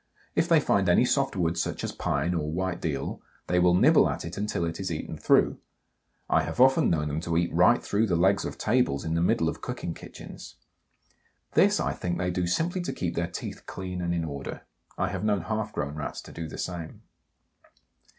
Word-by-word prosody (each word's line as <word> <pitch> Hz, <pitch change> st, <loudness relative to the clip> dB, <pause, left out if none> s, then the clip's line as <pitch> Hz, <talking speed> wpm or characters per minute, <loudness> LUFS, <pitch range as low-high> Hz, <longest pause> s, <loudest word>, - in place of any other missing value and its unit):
If 165 Hz, -, +2 dB
they 165 Hz, -2 st, +6 dB
find 100 Hz, -9 st, +2 dB
any 90 Hz, +8 st, +5 dB
soft 135 Hz, -1 st, +1 dB
wood 85 Hz, -2 st, 0 dB
such -, -, -2 dB
as -, -, -2 dB
pine 75 Hz, +5 st, -1 dB
or 75 Hz, -3 st, -2 dB
white 90 Hz, +1 st, -2 dB
deal, 75 Hz, -4 st, -3 dB, 0.2 s
they 90 Hz, -, +2 dB
will 90 Hz, 0 st, +5 dB
nibble -, -, +5 dB
at -, -, -4 dB
it 85 Hz, -, -6 dB
until 100 Hz, -4 st, -1 dB
it 85 Hz, 0 st, -4 dB
is 95 Hz, -2 st, -3 dB
eaten 80 Hz, -, -4 dB
through. -, -, +3 dB, 0.7 s
I -, -, +3 dB
have -, -, -5 dB
often 130 Hz, +1 st, +5 dB
known 75 Hz, -3 st, +1 dB
them 75 Hz, +1 st, -2 dB
to 85 Hz, -1 st, -1 dB
eat 85 Hz, 0 st, 0 dB
right 90 Hz, +8 st, +4 dB
through 110 Hz, +2 st, +1 dB
the 90 Hz, -, +1 dB
legs 95 Hz, +4 st, +3 dB
of -, -, -5 dB
tables 105 Hz, -, +1 dB
in 80 Hz, -, -1 dB
the 85 Hz, -, +1 dB
middle 85 Hz, -, +2 dB
of -, -, -3 dB
cooking 85 Hz, -, -4 dB
kitchens. -, -, -11 dB, 1.0 s
This, -, -, +4 dB
I -, -, 0 dB
think, 85 Hz, -1 st, -3 dB
they 90 Hz, -1 st, -1 dB
do 90 Hz, 0 st, -1 dB
simply 170 Hz, -, 0 dB
to 175 Hz, -, -3 dB
keep 85 Hz, -1 st, -2 dB
their 85 Hz, -, -1 dB
teeth 85 Hz, -, -7 dB
clean 90 Hz, -1 st, -5 dB
and 85 Hz, -1 st, -1 dB
in 85 Hz, -1 st, -1 dB
order; 70 Hz, -3 st, -6 dB, 0.3 s
I -, -, 0 dB
have 95 Hz, +1 st, -4 dB
known 105 Hz, -3 st, +2 dB
half 110 Hz, +5 st, -3 dB
grown 70 Hz, -6 st, -3 dB
Rats 75 Hz, -1 st, -5 dB
to -, -, -12 dB
do 80 Hz, -1 st, -6 dB
the -, -, -8 dB
same. 85 Hz, -3 st, -5 dB
90 Hz, 215 wpm, -27 LUFS, 85-100 Hz, 1.0 s, they